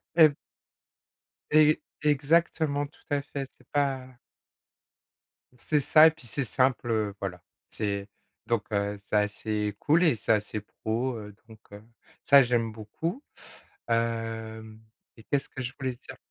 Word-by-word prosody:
Et 155 -4 +7 1.2
e 155 0 +6 0.2
exactement 150 0 +2
tout 145 - -26
à 145 -1 +1
fait, 140 -1 -6
c'est - - -24
pas 135 -3 -1 1.4
c'est 150 +5 0
ça 155 +3 +7
et 160 - +4
puis, 160 -5 -13
c'est 135 +3 -2
simple, 130 -1 +1
heu, 105 -3 0
voilà. 90 -3 -5 0.3
C'est 100 -2 -3 0.4
donc 115 -2 0
heu, 100 0 -1
c'est - - 0
assez 105 0 -1
cool 165 +4 +3
et 155 -7 +4
c'est 115 +1 +1
assez 105 0 -2
pro, 120 +4 -3
heu, 105 -1 -9
donc, 110 -1 -14
heu, 105 +1 -11 0.4
ça 140 0 +8
j'aime 120 -2 0
beaucoup, 160 - -5 0.7
hem, 115 -1 -2 0.4
et 115 - -14
qu'est-ce 140 +3 -1
que 135 - -7
je 125 +1 -4
voulais 130 -2 -2
dire? - - -12
120 Hz, 145 wpm, -28 LUFS, 110-145 Hz, 1.4 s, ça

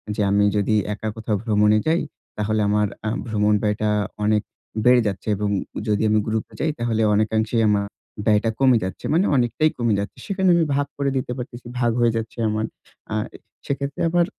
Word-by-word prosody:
যে - - -1
আমি 100 +1 +4
যদি 105 +1 +2 0.2
একা 105 +1 -5
কোথাও 110 -1 -2
ভ্রমণে 105 -1 +3
যাই 165 +2 +3 0.4
তাহলে 105 +1 0
আমার 105 0 +2 0.2
আ - - +2 0.2
ভ্রমণ 105 -1 +2
ব্যয়টা 105 0 0 0.3
অনেক 105 0 +3 0.4
বেড়ে 125 0 +6
যাচ্ছে। 95 -1 -4
এবং 105 +1 -1 0.4
যদি 105 0 +1
আমি 110 0 +3
গ্রুপ-এ 110 0 -2
যাই 155 - +1
তাহলে 115 -1 0
অনেকাংশেই 110 +2 +1
আমা 105 -1 +3 0.4
ব্যয়টা 110 +1 +3
কমে 130 -3 +5
যাচ্ছে। 95 - -5
মানে 175 +5 +3
অনেকটাই 130 +5 +2
কমে 120 -3 +1
যাচ্ছে। 100 - -5
সেখানে 190 -2 +1
আমি 170 - +3
ভাগ 145 0 +1
করে 140 -1 0
দিতে 130 - -3
পারতেছি। 120 0 -8
ভাগ 120 -1 +2
হয়ে 120 -1 +4
যাচ্ছে 115 +1 -5
আমার। 110 +1 -1 0.5
আ - - 0 0.5
সেক্ষেত্রে 140 0 -3
আবার 175 +1 +3
110 Hz, 180 wpm, -22 LUFS, 105-125 Hz, 0.5 s, বেড়ে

